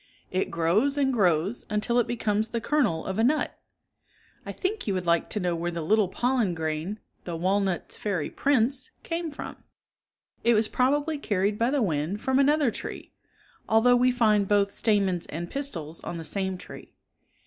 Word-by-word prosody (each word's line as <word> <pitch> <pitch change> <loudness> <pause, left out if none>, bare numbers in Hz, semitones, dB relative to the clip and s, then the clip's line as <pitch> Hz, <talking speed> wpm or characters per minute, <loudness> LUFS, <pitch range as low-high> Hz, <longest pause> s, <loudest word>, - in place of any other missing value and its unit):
It 185 +1 0
grows 190 - +1
and 270 -2 +2
grows 185 0 +1
until 210 +3 +1
it 240 - +1
becomes 220 -2 0
the 235 - -2
kernel 225 - +1
of 190 +2 -3
a - - +3
nut. 295 +6 +1 0.9
I - - -3
think 405 - -3
you 200 - +1
would 180 -1 -2
like 170 -1 +2
to 210 - -2
know 180 -3 0
where 170 +1 -2
the 170 -1 -4
little 210 +4 +3
pollen 240 -2 0
grain, 160 +5 -3 0.3
the 175 - -5
walnut's 190 +1 -1
Fairy 190 -8 -2
Prince, 260 -1 +1
came 335 0 -3
from. 290 - -8
(Ma<,nifiei.), - - -30 0.8
It 235 - +5
was 215 0 +2
])robably 290 +4 +1
carried 205 -1 0
by 230 +2 +3
the 275 -2 +1
wind 165 +2 -1
from 265 +4 +1
another 285 -3 +3
74 - - -5
tree, - - -8 0.6
although 225 +3 +5
we 250 +1 +4
find 215 -5 +3
both 200 -1 +3
stamens 195 -5 +1
and 170 +3 -6
pistils 170 - -4
on 170 - -5
the 165 - -6
same 190 +3 -2
tree. - - -12
210 Hz, 180 wpm, -27 LUFS, 180-250 Hz, 0.9 s, It